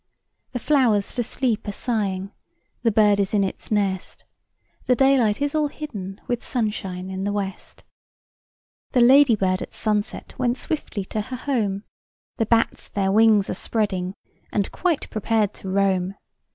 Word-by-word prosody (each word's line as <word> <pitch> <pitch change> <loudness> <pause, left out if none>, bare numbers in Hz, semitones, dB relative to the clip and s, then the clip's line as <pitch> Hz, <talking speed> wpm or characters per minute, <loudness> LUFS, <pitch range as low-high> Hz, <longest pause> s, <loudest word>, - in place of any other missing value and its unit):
The - - -1
flowers 235 -7 +2
for 245 - -2
sleep 240 -2 -1
are - - -1
sighing, 200 -4 -2 0.5
The 235 - +3
bird 210 -1 +4
is 200 +1 0
in 200 - +3
its 190 - -5
nest, 195 -3 -1 0.6
The 250 - +4
daylight 255 -6 +3
is 285 - -1
all 305 -1 +2
hidden 210 -11 -7
With 245 -1 -2
sunshine 195 -6 -3
in 190 0 -4
the 205 - 0
west. 195 -2 -5 1.1
The 250 - +4
ladybird 235 -8 +5
at - - -7
sunset 210 -1 -1
Went 245 0 +1
swiftly 280 - -3
to 215 - -3
her 255 +4 -6
home; 215 -8 -1 0.5
The 225 - 0
bats 230 0 +1
their 195 -1 0
wings 215 -1 +5
are - - -2
spreading, 190 -3 -1 0.4
And 200 -2 0
quite 345 -5 0
prepared 215 -1 +1
to 190 - -8
roam. 190 -1 +1
210 Hz, 150 wpm, -23 LUFS, 195-245 Hz, 1.1 s, ladybird